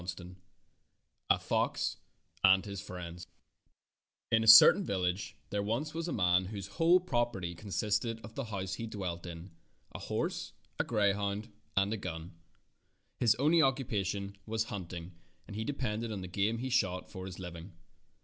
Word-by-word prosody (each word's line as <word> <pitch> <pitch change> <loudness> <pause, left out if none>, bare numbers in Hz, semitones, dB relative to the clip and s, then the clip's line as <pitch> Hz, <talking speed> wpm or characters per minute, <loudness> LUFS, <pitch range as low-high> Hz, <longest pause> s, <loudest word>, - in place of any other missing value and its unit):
I - - -10 1.2
A - - +5
FOX - - 0 0.5
AND 95 0 +6
HIS 100 -2 -5
FRIENDS 90 -2 -8 1.0
I - - +6
N 110 - +1
a - - -2
certain 115 - +10
village 90 - -2 0.2
there 105 - 0
was 120 +9 -2
once 165 +1 -3
a - - -2
man 90 -2 +3
whose 100 0 -6
whole 165 - +4
property 120 - -1
consisted 105 +4 -1
of 110 +1 -10
the 140 0 -4
house 95 -4 -4
he 115 +4 -4
dwelt 90 -5 -5
in, 85 +2 -8 0.4
a - - -6
horse, - - -3 0.3
a - - +3
greyhound, 100 0 0 0.3
and 100 +2 +3
a - - -2
gun. 80 -2 -6 0.9
His 115 -3 +4
only 155 +7 +4
occupation 100 -8 0
was 110 0 0
hunting, 90 -2 -6 0.3
and 100 - -9
he 110 - -2
depended 115 -4 -2
on 100 -3 -4
the 90 - -6
game 100 +5 0
he 130 +2 -4
shot 95 -7 0
for 95 0 -7
his 90 - -8
living. 90 0 -8
100 Hz, 160 wpm, -32 LUFS, 95-115 Hz, 1.2 s, certain